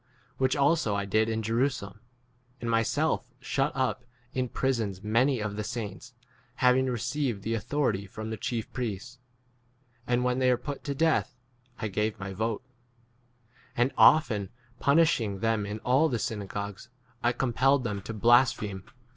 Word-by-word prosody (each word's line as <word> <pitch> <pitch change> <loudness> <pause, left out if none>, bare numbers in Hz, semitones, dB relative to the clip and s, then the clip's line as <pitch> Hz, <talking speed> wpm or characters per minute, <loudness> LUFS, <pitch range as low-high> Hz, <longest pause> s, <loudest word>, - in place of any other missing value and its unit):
Which 130 0 +2
also 140 -7 +2
I 100 0 -1
did 110 +3 +2
in 110 0 -1
Jerusalem, 115 -3 -1 0.6
and 115 -1 -2
myself 125 +3 0
shut 135 +2 0
up 130 -1 0 0.3
in 130 -1 -1
prisons 115 -9 -1
many 120 +5 +2
of 105 -1 -3
the 105 - -2
saints, 115 +2 -6 0.4
having 130 +1 +3
received 125 -2 -2
the 115 - -1
autho 125 +3 0
rity 100 0 -6
from 110 +3 -6
the - - -2
chief 115 +1 -4
priests; 120 0 -4 0.9
and 125 0 +2
when 125 0 +1
they 130 -1 +3
were 125 - +3
put 140 +3 -6
to 140 -1 -2
death 160 +2 +1 0.4
I - - -4
11 105 - -3
gave 105 +1 -1
my 95 0 -5
vote. 110 +4 -2 1.1
And 120 +3 +2
often 105 -11 +5 0.3
punish 160 0 +4
ing 100 -3 -3
them 110 -1 0
in 105 +1 -4
all 135 +6 +3
the 120 - 0
synagogues, 105 -2 -5 0.3
I 120 - +3
compelled 130 +2 +2
them 105 -4 -3
to 110 - -6
blaspheme. 110 -4 +3
120 Hz, 160 wpm, -28 LUFS, 105-130 Hz, 1.1 s, often